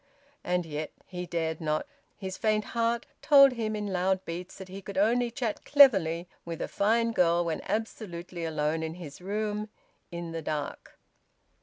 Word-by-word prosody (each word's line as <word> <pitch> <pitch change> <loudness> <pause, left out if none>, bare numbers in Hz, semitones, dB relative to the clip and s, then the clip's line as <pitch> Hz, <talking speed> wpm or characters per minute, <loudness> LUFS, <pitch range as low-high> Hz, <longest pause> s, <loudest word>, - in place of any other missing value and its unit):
And 180 -1 0
yet 155 -1 -4
he 180 -1 -6
dared 160 -2 -2
not; 155 -1 0 0.3
his 190 -2 -5
faint 215 -1 +1
heart 235 0 0 0.2
told 275 -2 +8
him 220 -3 -2
in 210 -1 -3
loud 185 +1 +1
beats 175 +2 -6
that 190 - -8
he 190 +1 -8
could 200 0 -7
only 235 +4 +3
chat 235 -3 -3
cleverly 190 - +5 0.2
with 165 -1 -6
a - - -2
fine 230 +3 +2
girl 175 -4 +3
when 160 -2 -2
absolutely 185 -5 -4
alone 155 0 0
in 160 0 -4
his 165 -3 -9
room, 210 +2 -2 0.4
in 170 -1 -5
the 165 0 -4
dark. 150 -1 -4
185 Hz, 165 wpm, -29 LUFS, 165-215 Hz, 0.4 s, told